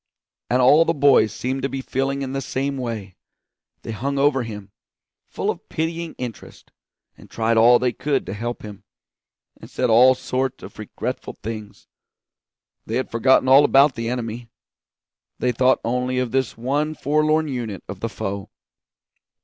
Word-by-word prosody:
And 125 +1 +3
all 145 +6 +7
the 165 0 0
boys 140 -7 +4
seemed 130 +5 -3
to 135 - -1
be 135 - -4
feeling 135 +1 -2
in 130 0 -5
the 135 - -2
same 135 +2 -2
way; 115 -7 -5 0.7
they - - -5
hung 140 +6 -3
over 140 -1 +3
him, 105 -4 -8 0.6
full - - -2
of - - -12
pitying 165 +1 -3
interest, 120 -4 -9 0.4
and - - -17
tried 115 0 0
all 120 +2 +7
they 125 -1 0
could 145 +2 -1
to 95 - -5
help 120 +3 -5
him, 105 -2 -10 0.7
and - - -13
said 125 -2 0
all 125 +3 +7
sorts 130 0 -3
of - - -11
regretful - - -5
things. 110 -1 -8 1.0
They 110 - -3
had 130 - -2
forgotten 130 +3 +3
all 135 +2 +7
about 140 0 +5
the 115 -1 -4
enemy; 120 -1 -4 0.9
they 125 - 0
thought 130 +2 +3
only 125 +2 -1
of 125 -2 -1
this 130 -2 -1
one 145 +6 -1
forlorn 155 +2 +1
unit 120 - -5
of - - -7
the - - -3
foe. 100 0 -5
125 Hz, 165 wpm, -22 LUFS, 115-135 Hz, 1.0 s, all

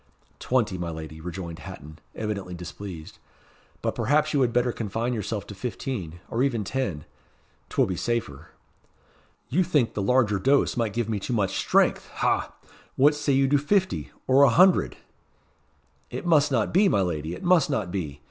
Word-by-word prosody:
"Twenty, 115 -8 0
my 85 -1 -3
lady," 80 -1 -8
rejoined 85 -1 -6
Hatton, 75 +2 -10 0.2
evidently 100 -4 -4
displeased; 85 -1 -9 0.6
"but - - 0
perhaps 150 +7 +1
you 140 - +2
had 125 -2 +2
better 125 +1 +2
confine 115 +2 -2
yourself 105 -1 -3
to - - -9
fifteen, 95 - -5
or 115 - 0
even 125 -5 +1
ten. 95 - -3 0.6
'T - - -10
will - - +5
be 95 - -3
safer." 115 - -3 1.0
"You 180 +8 +2
think 150 -9 +1
the 105 - -2
larger 105 -2 +2
dose 135 +8 +2
might 115 -4 -1
give 120 -2 -1
me 110 -2 -1
too 110 - -4
much 100 -4 0
strength - - +2
ha! - - 0 0.4
What 145 +3 +5
say 145 -1 0
you 135 0 +3
to 145 0 +4
fifty, 190 +6 0 0.2
or 130 +2 +4
a 140 - +7
hundred?" 180 +9 +4 1.1
"It 125 - -6
must 150 -4 +4
not 115 -5 0
be, 195 +3 +5
my 100 - +2
lady 85 -2 -2
it - - -10
must 175 -5 +4
not 115 -11 -1
be. 75 -7 -4
115 Hz, 175 wpm, -25 LUFS, 90-135 Hz, 1.1 s, a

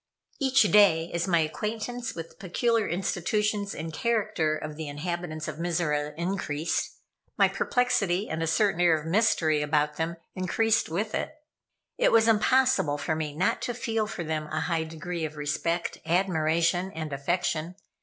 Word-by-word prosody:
Each 270 -3 +4
day, 180 -5 +4
as 170 +1 -1
my 170 -3 +3
acquaintance 220 +10 -3
with 165 -1 -6
the - - -21
peculiar 225 +4 0
institutions 200 +3 -1
and 160 0 -5
character 210 -7 0
of 155 0 -6
the 160 0 -6
inhabitants 155 +1 -4
of 155 -1 -5
Mizora 150 -4 -1
increased, 170 -3 -2 0.4
my - - +6
perplexity 205 -6 +1
and 160 +1 -3
a 165 - 0
certain 195 +1 +2
air 170 -3 +4
of 150 - -10
mystery 165 -5 +2
about 150 0 +1
them 165 +1 -2 0.2
increased 220 +4 +1
with 205 +7 -2
it. 310 - -3 0.6
It - - +4
was 225 0 +5
impossible 230 - +3
for 160 +2 -1
me 155 -2 -4
not 180 +4 +1
to 245 - -3
feel 225 -3 -1
for 215 -5 -5
them 155 -1 -3
a 155 +1 -2
high 160 -1 -1
degree 165 +1 -5
of 155 -1 -4
respect, 165 +4 -2
admiration, 170 +1 +1
and 155 -2 -5
affection. 165 +3 -1
170 Hz, 160 wpm, -27 LUFS, 155-210 Hz, 0.6 s, my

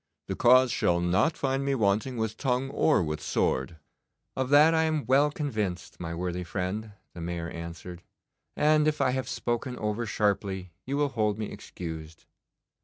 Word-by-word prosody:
The - - -2
cause 125 +1 +5
shall 85 0 +2
not 90 - +2
find 135 +1 0
me 140 0 +1
wanting 110 +3 +1
with 110 -1 -2
tongue 130 +2 -1
or 150 - +3
with 75 -1 -3
sword.' 65 +5 0 0.6
'Of 130 -1 -1
that 150 +3 +7
I 160 - +3
am 155 -2 0
well 140 +3 +4
convinced, 110 - -3
my 85 -1 -4
worthy 90 +1 -3
friend,' 100 +4 -4 0.2
the 85 - -8
Mayor 85 -1 -4
answered, 85 +1 -8 0.6
'and 155 0 +4
if 155 0 0
I 135 -2 +3
have 130 0 -2
spoken 120 +1 -2
over 105 +2 -2
sharply 100 -3 -1 0.2
you 140 +1 -1
will 145 -1 +2
hold 105 -4 0
me 110 -1 -4
excused. 80 -2 -8
110 Hz, 170 wpm, -28 LUFS, 90-135 Hz, 0.6 s, that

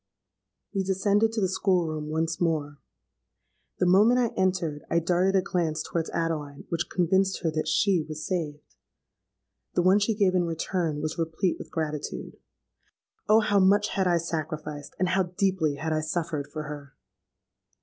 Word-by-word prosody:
"We 195 - 0
descended 200 +3 +2
to 225 - -1
the 190 - +3
school 185 -1 +1
room 155 -1 -4
once 160 +1 -1
more. 150 -4 -1 1.0
The - - +1
moment 205 +7 +5
I 240 -2 +2
entered 180 -6 0
I 170 - +2
darted 180 +3 +2
a 190 - +3
glance 165 -5 -1
towards 165 -1 -3
Adeline 155 -4 -3
which 170 0 -2
convinced 190 +2 +1
her 165 - +1
that 155 0 -2
she 190 -5 +2
was 155 0 -5
saved. 155 -5 -3 1.1
The 175 - +3
one 190 +3 +5
she 210 +2 +1
gave 200 -3 +3
in 180 -1 +2
return 165 -2 -2
was 155 +2 -3
replete 165 +2 -1
with - - -8
gratitude. 155 -2 -4 0.9
Oh! 220 +1 +6
how 205 -2 +2
much 205 +2 +4
had 190 -1 0
I 175 -1 +3
sacrificed, 155 -3 -5
and 185 0 +1
how 190 +1 +2 0.2
deeply 185 -7 +1
had 155 +3 -2
I 155 - 0
suffered 155 -2 -2
for 155 -1 -4
her! 145 -2 -8
170 Hz, 165 wpm, -27 LUFS, 155-190 Hz, 1.1 s, Oh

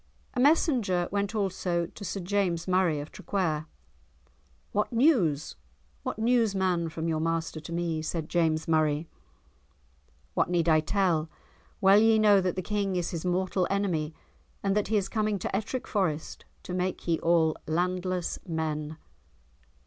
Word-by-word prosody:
A - - -2
messenger 250 - +3
went 200 +2 -1
also 185 -4 0
to 200 - -11
Sir 195 0 -3
James 180 -2 0
Murray 180 -5 +2
of 145 +2 -7
Traquair. 160 -6 -2 1.0
"What 210 - 0
news? 225 - +2 0.4
What - - -4
news, 225 -2 +2
man, 180 -3 +1
from 160 +1 -4
your 160 -1 0
master 165 0 -1
to 155 - -10
me?" 170 -2 -1
said 160 0 -3
James 160 -2 +1
Murray. 155 -1 +1 1.3
"What - - +1
need 175 -2 +1
I 160 -1 +5
tell? 165 -1 +1 0.5
Well 195 +1 +7
ye 225 0 +5
know 205 -2 +5
that 180 -1 -1
the 185 - -3
King 200 -2 -1
is 175 -2 -1
his 170 0 -4
mortal 180 0 0
enemy 175 -6 -1 0.5
and 195 0 +1
that 210 - +1
he 215 +1 +2
is 195 -2 0
coming 215 -1 0
to 190 - -3
Ettrick 225 +5 -3
Forest 165 -7 -2 0.2
to 180 - -6
make 180 0 -2
ye 165 -2 +2
all 165 -2 +3
landless 180 +2 -1
men." 155 -2 -3
180 Hz, 155 wpm, -28 LUFS, 160-200 Hz, 1.3 s, Well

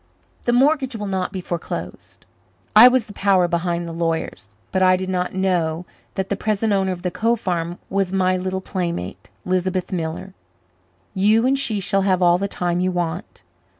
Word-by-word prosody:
The 240 - +2
mortgage 265 0 +2
will 210 -2 -4
not 190 -2 -2
be 190 - -5
foreclosed. 175 -2 -6 0.5
I 225 +4 +11
was 250 -3 +3
the 205 - -12
power 190 -3 +3
behind 170 0 -1
the - - -5
lawyers, 165 - -3 0.2
but 190 - 0
I 185 0 +5
did 185 0 -4
not 180 0 -2
know 175 -3 0 0.3
that 190 0 -2
the 200 - 0
present 215 +1 0
owner 190 -1 +1
of 180 -1 -6
the 180 - -1
Cove 230 +4 0
farm 175 -2 -2
was 195 -2 -1
my 185 -1 +2
little 185 +1 -2
playmate, 170 - -4 0.2
Lisbeth 185 0 -1
Miller. 170 +1 -4 0.8
You 210 +4 +3
and 265 +1 +3
she 225 -7 -1
shall 195 +1 0
have 190 -2 +2
all 175 0 +4
the 200 - -1
time 175 -2 -2
you 185 +1 +1
want. 175 0 -4
185 Hz, 185 wpm, -21 LUFS, 175-200 Hz, 0.8 s, I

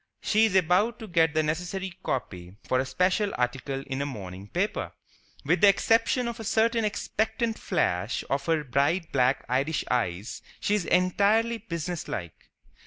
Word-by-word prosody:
She 220 +1 +3
is 205 -4 0
about 190 +6 +3
to 220 - -9
get 165 -4 +2
the 155 - +3
necessary 180 +4 -3
copy 90 - -4
for 130 - +1
a 130 - 0
special 190 +6 +1
article 135 +2 -2
in 135 +1 -3
a - - -1
morning 95 -6 -8
paper. 185 - -2 0.5
With - - +2
the 205 - +8
exception 230 +5 +2
of 235 0 -5
a - - -5
certain 225 +2 +2
expectant 220 +2 -1
flash 90 +6 -1
of 140 0 -2
her 160 -2 +2
bright 145 +6 0
black 130 0 +2
Irish 135 +6 0
eyes, 105 -4 -2 0.2
she 205 - 0
is 205 -5 +1
entirely 210 +5 +2
businesslike. 170 - -5
170 Hz, 160 wpm, -27 LUFS, 130-210 Hz, 0.5 s, the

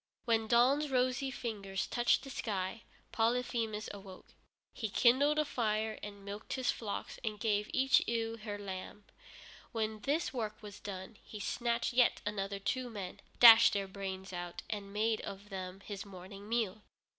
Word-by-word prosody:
When 225 -2 +2
dawn's 260 +6 +4
rosy 255 +1 +1
fingers 200 -7 -3
touched 240 -1 +2
the 270 - -8
sky, 200 -2 -3 0.3
Polyphemus 230 -2 0
awoke. 195 -2 -11 0.4
He 220 -4 -3
kindled 270 +8 +4
a 305 - +3
fire, 220 -4 -1
and 200 -1 -8
milked 205 +2 -6
his 260 -1 +1
flocks, 210 -3 -5
and 215 -2 -3
gave 210 -1 +1
each 265 0 +4
ewe 230 -1 -1
her 210 -2 -5
lamb. 200 +1 -7 0.7
When 220 -1 -1
this 290 +8 0
work 215 -4 -3
was 205 -1 -9
done 195 +1 -7
he 210 - -9
snatched 235 +3 -1
yet 245 0 +4
other 200 -1 -2
two 250 +5 -2
men, 200 -5 -6 0.2
dashed 230 -1 +10
their 200 -1 -1
brains 190 -1 -6
out, 175 -1 -5
and 200 -2 -4
made 220 +2 +1
of 200 +1 -8
them 190 -1 -6
his 200 -1 -6
morning 195 +1 -10
meal. 220 -3 0
215 Hz, 155 wpm, -34 LUFS, 200-235 Hz, 0.7 s, dashed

